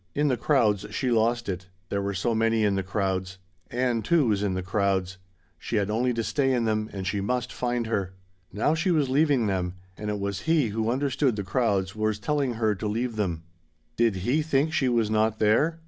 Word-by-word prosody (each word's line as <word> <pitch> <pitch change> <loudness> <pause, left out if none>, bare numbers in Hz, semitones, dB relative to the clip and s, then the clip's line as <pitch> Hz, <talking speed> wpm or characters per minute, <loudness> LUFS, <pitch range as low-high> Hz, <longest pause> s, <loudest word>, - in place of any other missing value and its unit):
In 145 0 +2
the 130 - +2
crowds 115 -6 +2
she 130 -2 -1
lost 120 +1 +1
it. 90 -1 -4 0.2
There 100 - -1
were 100 0 -2
so 115 +6 0
many 115 0 +2
in 105 -1 +3
the 95 - 0
crowds. 95 -1 -2 0.3
Ann, 120 -1 0
too, 155 -2 +2
was 100 -2 +1
in 100 -3 0
the 95 - -2
crowds. 95 -1 0 0.4
She 115 - -4
had 105 -1 +1
only 125 +3 +1
to 115 - -1
stay 135 +2 +1
in 120 -2 0
them 110 0 0
and 95 -2 -5
she 100 +1 -1
must 125 +4 -2
find 120 -1 -1
her. 100 -4 -2 0.4
Now 110 - +1
she 165 +4 0
was 150 -6 +2
leaving 140 -3 +3
them; 95 -3 -1 0.2
and 105 0 -5
it 105 - -1
was 100 0 -2
he 155 -8 +3
who 110 +2 -1
understood 135 0 +1
the 100 - -3
crowds 95 -2 0
was 110 -1 0
telling 135 +2 -1
her 110 -2 +1
to 105 +2 -4
leave 115 +3 -2
them. 90 -6 -2 0.5
Did 115 -3 +2
he 140 +6 +2
think 155 0 +1
she 130 -5 +2
was 115 -3 +1
not 110 0 +2
there? 140 +11 +2
110 Hz, 215 wpm, -26 LUFS, 100-125 Hz, 0.5 s, in